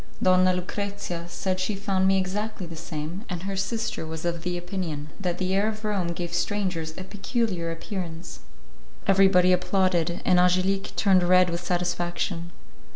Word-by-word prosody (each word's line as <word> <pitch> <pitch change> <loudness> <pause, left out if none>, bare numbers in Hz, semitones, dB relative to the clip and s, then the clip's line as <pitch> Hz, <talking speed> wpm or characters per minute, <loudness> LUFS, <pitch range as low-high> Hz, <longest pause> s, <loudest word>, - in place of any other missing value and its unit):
Donna 185 0 +5
Lucrezia 185 -1 -3
said 185 +1 -2
that - - -7
she 185 +3 -1
found 195 -1 +1
me 195 0 +4
exactly 195 +1 -2
the 165 -1 -8
same, 160 +3 -5
and 175 -1 -4
her 195 0 -3
sister 225 +1 -2
was 160 +1 -5
of 170 -1 -1
opinion 175 -4 -3
that 180 -3 -1
the 185 0 -1
air 200 +2 +3
of 215 0 -4
Rome 200 -4 0
gave 175 0 -5
strangers 175 -4 -1
a 185 - -5
peculiar 195 -3 -2
appearance. 170 -1 -6 0.7
Everybody 190 -2 +5
applauded, 180 -2 +1
and 180 -1 +5
Angelique 185 +2 +2
turned 190 -3 +4
red 180 0 +5
with 170 +1 -3
satisfaction. 175 0 -1
185 Hz, 155 wpm, -26 LUFS, 175-195 Hz, 0.7 s, Donna